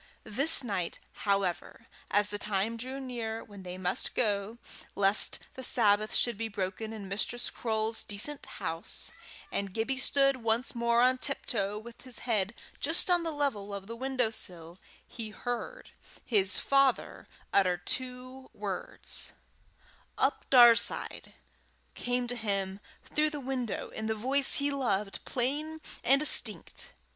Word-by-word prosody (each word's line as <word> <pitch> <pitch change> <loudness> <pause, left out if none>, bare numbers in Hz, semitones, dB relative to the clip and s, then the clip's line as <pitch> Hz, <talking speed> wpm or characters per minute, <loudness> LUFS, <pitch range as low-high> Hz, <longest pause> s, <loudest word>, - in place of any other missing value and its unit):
This 275 +7 +4
night, 195 -7 -3 0.3
however, 190 -3 -1 0.2
as 205 +1 +2
the 205 0 -2
time 210 +2 -1
drew 260 +4 -6
near 230 -4 -5
when 205 -2 -12
they 180 0 -7
must 185 -1 -2
go, 210 -1 0 0.4
lest 200 +1 +4 0.2
the 260 - -8
Sabbath 215 -4 +3
should 235 -4 +1
be 225 - -1
broken 200 +1 -4
in 210 -3 -7
Mistress 215 +5 -2
Croale's 220 -1 -1
decent 240 +8 -1
house, 165 +1 -1 0.4
and 200 -2 -3
Gibbie 260 +4 -1
stood 275 0 +3
once 230 +2 0
more 235 0 +2
on 255 0 +3
tiptoe, 210 -8 -1
with 235 +2 -11
his 255 -2 -2
head 215 -2 0 0.2
just 325 +4 +2
on 350 -1 +4
the 335 - -3
level 265 -10 -2
of 195 -1 -7
the 230 +3 -7
windowsill, 220 -10 -2 0.3
he 225 -3 -6
heard 245 - -6 0.3
his 200 -4 +3
father 275 -2 +1 0.3
utter 185 -3 +3
two 255 +3 -4
words: - - -5 0.8
"Up - - 0
Daurside" 240 -3 +5 0.6
came 245 0 -2
to 245 0 -1
him 200 -4 -1 0.3
through 305 0 +1
the 300 -1 -6
window, 255 -4 -4
in 220 - -5
the 220 - 0
voice 265 +5 +7
he 285 0 +3
loved, 210 -8 -2
plain 295 +5 -1 0.2
and 275 +3 +4
distinct. 215 - +2
230 Hz, 140 wpm, -30 LUFS, 205-260 Hz, 0.8 s, voice